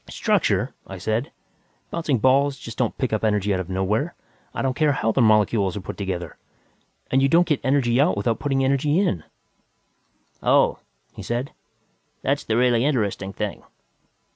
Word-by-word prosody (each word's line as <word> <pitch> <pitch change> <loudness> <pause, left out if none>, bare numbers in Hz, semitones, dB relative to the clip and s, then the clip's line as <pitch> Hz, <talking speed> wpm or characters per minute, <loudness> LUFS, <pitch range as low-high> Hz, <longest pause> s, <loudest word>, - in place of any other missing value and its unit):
"Structure!" - - 0
I 95 - -7
said. 110 +7 -2 0.6
"Bouncing 160 -6 0
balls 135 +4 +3
just 115 -2 -9
don't 120 -3 -1
pick 130 -4 -1
up 110 - -1
energy 105 -2 +1
out 95 - -1
of 95 -1 -5
nowhere, 105 - -1 0.4
I - - -4
don't 130 -1 +1
care 150 +1 +2
how 115 -4 0
their 125 +3 +2
molecules 105 -3 +3
are - - -5
put - - -7
together. 90 -4 -4 0.7
And 135 - +3
you 135 - +3
don't 170 +3 +5
get 150 -5 0
energy 130 -1 +2
out 145 - +2
without 115 +3 0
putting 135 -2 0
energy 140 +3 +1
in." 100 - 0 1.2
"Oh," - - +3 0.3
he - - -9
said, 120 +3 -3 0.7
"that's - - 0
the 110 - 0
really 120 -1 +3
interesting 105 -8 -1
thing. 105 0 -4
120 Hz, 165 wpm, -23 LUFS, 105-135 Hz, 1.2 s, don't